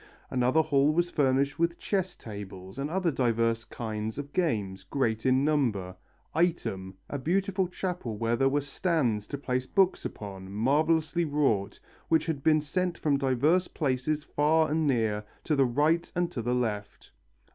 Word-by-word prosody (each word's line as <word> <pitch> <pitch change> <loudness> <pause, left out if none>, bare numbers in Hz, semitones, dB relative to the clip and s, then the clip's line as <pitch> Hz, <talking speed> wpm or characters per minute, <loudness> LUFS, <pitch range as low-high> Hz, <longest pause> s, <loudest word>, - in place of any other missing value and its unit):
Another 130 +5 +3
hall 145 -1 +3
was 175 +2 +1
furnished 140 +1 +1
with 170 0 +1
chess 190 -2 -1
tables 100 0 -9
and 140 +2 -2
other 180 0 +1
diverse 115 -3 +1
kinds 110 -1 -5
of 145 0 -6
games, 105 - 0
great 115 -3 -1
in 130 +2 +3
number. 115 -12 0 0.4
Item, 100 - -1
a 145 - -4
beautiful 190 +5 0
chapel 180 - -4
where 115 +2 +1
there 135 +2 +3
were 145 +2 +1
stands 135 - 0
to 140 - -4
place 130 -2 -2
books 190 -2 +2
upon, 95 -2 -7
marvellously 155 - +2
wrought, 140 -10 0 0.3
which 160 -1 +3
had 160 -4 -2
been 155 +1 +4
sent 180 +4 -1
from 145 -3 +1
diverse 145 +7 +2
places 145 +1 -1
far 155 +2 +2
and 155 0 +1
near, 110 -5 +1 0.2
to 155 - +1
the 135 -1 +4
right 150 +7 +1
and 175 0 0
to 130 - -3
the 120 +2 0
left. 105 -4 -3
140 Hz, 160 wpm, -28 LUFS, 115-160 Hz, 0.4 s, been